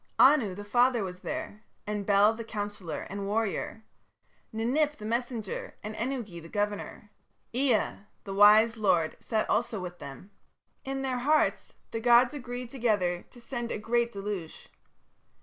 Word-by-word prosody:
Anu, 260 -9 +5
the 205 - -7
father, 240 +1 +3
was 180 -1 -6
there, 310 -5 -5 0.2
and 210 -1 -3
Bel 205 +2 +5
the 230 +1 -6
counsellor 205 -5 -5
and 200 0 -4
warrior, 220 +1 -2 0.7
Ninip 275 +7 +1
the 210 - -9
messenger, 235 -2 -3
and 215 +1 -5
Ennugi 230 -7 -4
the 165 - -12
governor. 205 +1 -3 0.4
Ea, 250 -4 +1 0.3
the 195 - -6
wise 215 +3 +6
lord, 175 -7 +2
sat 220 -2 -1
also 225 -2 0
with 180 -1 -7
them. 140 +8 -10 0.5
In 270 0 -3
their 255 -2 -1
hearts 300 +5 +1 0.2
the 225 - -2
gods 240 +3 +5
agreed 245 -3 -6
together 205 -9 0
to 245 - -16
send 240 -1 -5
a - - -2
great 235 +2 0
deluge. 195 -5 -6
220 Hz, 150 wpm, -29 LUFS, 205-245 Hz, 0.7 s, wise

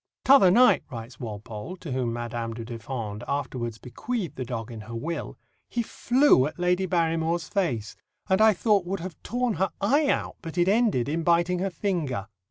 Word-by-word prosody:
"T'other 265 -9 +7
night," 245 +7 +6
writes 120 -1 -8
Walpole, 110 - -7
to 165 -5 -8
whom 125 -2 -1
Madame 120 -1 -4
du 115 -1 -6
Deffand 115 -3 -5
afterwards 130 -5 -3
bequeathed 185 - -4
the 130 - -3
dog 115 -2 -5
in 110 -2 -7
her 115 +2 -8
will, 165 +8 -4 0.3
"he 235 - -1
flew 245 - +3
at - - -8
Lady 180 +1 +1
Barrymore's 165 -1 0
face, 125 - -1 0.3
and 190 +2 +3
I 220 0 +7
thought 205 0 +2
would 195 +1 -2
have 180 -2 -6
torn 245 -3 -1
her 190 - +3
eye 280 +9 +3
out, - - -1
but 165 +1 -8
it 175 0 +3
ended 205 - +2
in 160 +3 -1
biting 170 +2 +2
her 195 +2 0
finger. 165 - -2
165 Hz, 180 wpm, -26 LUFS, 120-190 Hz, 0.3 s, T'other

